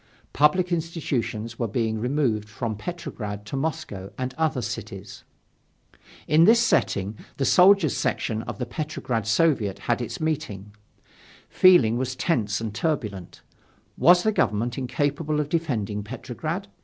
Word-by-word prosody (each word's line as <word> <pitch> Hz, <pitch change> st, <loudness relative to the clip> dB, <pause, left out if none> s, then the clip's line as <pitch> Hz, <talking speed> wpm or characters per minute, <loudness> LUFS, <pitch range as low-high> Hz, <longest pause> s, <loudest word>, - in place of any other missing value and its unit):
Public 175 Hz, +5 st, +3 dB
institutions 140 Hz, -9 st, -3 dB
were 115 Hz, -, 0 dB
being 110 Hz, 0 st, -1 dB
removed 120 Hz, -4 st, 0 dB
from 110 Hz, +1 st, -4 dB
Petrograd 105 Hz, -, -6 dB
to 105 Hz, -, -5 dB
Moscow 130 Hz, -10 st, -4 dB
and 130 Hz, 0 st, -3 dB
other 160 Hz, -3 st, 0 dB
cities. -, -, -7 dB, 1.0 s
In 155 Hz, +2 st, +5 dB
this 230 Hz, +4 st, +6 dB
setting, 100 Hz, -, +1 dB, 0.2 s
the 135 Hz, -, 0 dB
Soldiers' 185 Hz, -2 st, +5 dB
section 115 Hz, -4 st, -1 dB
of -, -, -6 dB
the 125 Hz, -, -3 dB
Petrograd 120 Hz, -5 st, -3 dB
Soviet 110 Hz, -5 st, +2 dB
had 120 Hz, 0 st, -1 dB
its 120 Hz, -, -5 dB
meeting. 105 Hz, -, -3 dB, 0.8 s
Feeling 125 Hz, -11 st, +5 dB
was 130 Hz, 0 st, -2 dB
tense 110 Hz, -, 0 dB
and 110 Hz, -2 st, -4 dB
turbulent, 110 Hz, -, -3 dB, 0.5 s
Was 175 Hz, +6 st, +5 dB
the 220 Hz, -, +3 dB
Government 120 Hz, -, 0 dB
incapable 145 Hz, +4 st, -1 dB
of 150 Hz, -1 st, -2 dB
defending 115 Hz, -12 st, -1 dB
Petrograd? 130 Hz, -, -5 dB
130 Hz, 130 wpm, -25 LUFS, 110-160 Hz, 1.0 s, this